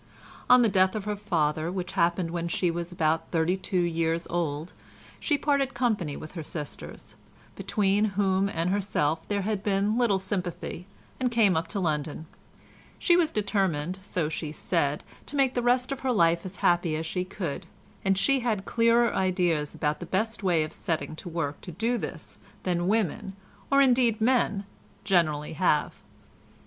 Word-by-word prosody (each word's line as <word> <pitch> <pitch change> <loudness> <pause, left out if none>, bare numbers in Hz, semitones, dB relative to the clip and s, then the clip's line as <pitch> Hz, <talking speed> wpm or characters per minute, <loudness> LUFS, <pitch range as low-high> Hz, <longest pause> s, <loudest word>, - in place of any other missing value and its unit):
On 250 0 +8
the - - +5
death 185 -1 +3
of 210 -2 -3
her 210 0 -1
father, 165 -5 0
which 185 -1 -4
happened 170 -1 +1
when 170 0 -2
she 170 +1 0
was 170 +1 -4
about 165 -1 0
thirty 165 +2 +1
two 190 -1 -1
years 165 0 0
old, 165 -1 -2 0.5
she 295 - +1
parted 280 -2 +1
company 210 - 0
with 155 - -9
her 170 - -6
sisters, 150 -1 -7 0.4
between 205 0 +1
whom 195 -1 +2
and 170 -1 -1
herself 165 -6 0
there 200 -1 -1
had 210 -1 -1
been 205 +3 +1
little 225 -5 +3
sympathy, 185 -2 -4 0.3
and 255 -1 +1
came 225 -5 +3
up 160 +1 0
to 205 - -3
London. 155 -2 -2 0.7
She 345 - +4
was 335 -3 +3
determined, 190 -5 0
so 180 -4 -2
she 155 -1 -4
said, 150 -2 -1 0.2
to - - -6
make 270 -2 +3
the 245 - 0
rest 250 +2 +2
of 275 - -3
her 260 -1 0
life 170 -4 +3
as 185 - -9
happy 175 -2 +3
as 160 +1 -3
she 180 +3 -2
could, 180 -5 -5 0.4
and 195 -2 +2
she 275 +7 +3
had 220 -5 -1
clearer 235 0 +3
ideas 175 -5 +1
about 150 0 -1
the 175 - -7
best 220 +6 -1
way 175 -5 +2
of 155 - -6
setting 160 -1 -3
to 175 - -7
work 160 -4 -3
to 180 - -8
do 230 +8 0
this - - -7 0.2
than 175 -1 0
women, 195 -2 0 0.3
or 275 0 +5
indeed 245 -4 +3
men, 220 -4 +2 0.4
generally 160 -6 +1
have. 155 - +1
185 Hz, 175 wpm, -27 LUFS, 165-215 Hz, 0.7 s, On